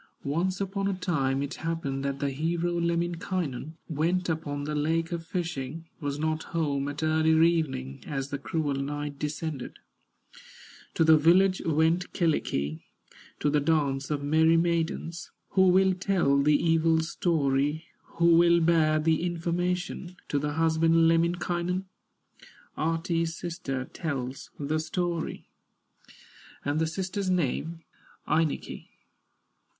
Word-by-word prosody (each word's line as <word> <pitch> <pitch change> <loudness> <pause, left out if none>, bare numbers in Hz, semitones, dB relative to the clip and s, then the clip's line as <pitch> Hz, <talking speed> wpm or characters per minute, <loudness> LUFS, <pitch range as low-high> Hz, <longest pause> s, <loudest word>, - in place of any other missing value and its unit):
Once 175 +7 0
upon 195 0 -2
a 200 - 0
time 140 -7 0
it 140 - -4
happened 160 -5 -2
That 140 0 -2
the 140 -1 -1
hero, 170 +5 -1
Lemminkainen, 170 -3 -2
Went 170 +4 0
upon 145 -3 -2
the 150 +1 -3
lake 165 +3 0
a 170 - -1
fishing, 165 -3 -4
Was 145 -3 -3
not 155 +1 -1 0.2
home 140 -3 0
at 145 +2 -4
early 160 +1 +4
evening, 135 -5 -3
As 135 -1 -3
the 140 -1 -4
cruel 150 0 -1
night 145 +1 -4
descended; 150 -3 -4 1.2
To - - +3
the 160 0 +7
village 185 +5 +4
went 160 +3 +2
Kyllikki, 80 - 0 0.6
To 145 - +2
the 150 - +3
dance 140 -3 0
of 145 -2 -2
merry 160 +3 +4
maidens. 170 0 -1 0.2
Who 190 -1 +4
will 190 +1 +4
tell 180 -7 +2
the 150 +1 +4
evil 165 0 +3
story, 150 -2 0 0.3
Who 170 0 +5
will 170 0 +5
bear 160 -2 +3
the 160 +1 +2
information 175 +1 -2
To 145 - +1
the 150 +1 -2
husband, 165 +1 +3
Lemminkainen? 175 +2 0 0.9
Ahti's 165 +1 -1
sister 145 -7 -4
tells 135 -6 -5
the 150 +2 -1
story, 170 +1 -3 1.2
And 145 +2 0
the 160 - +1
sister's 190 +3 -3
name, 165 -1 -1 0.4
Ainikki. 155 -1 -1
160 Hz, 125 wpm, -28 LUFS, 145-170 Hz, 1.2 s, the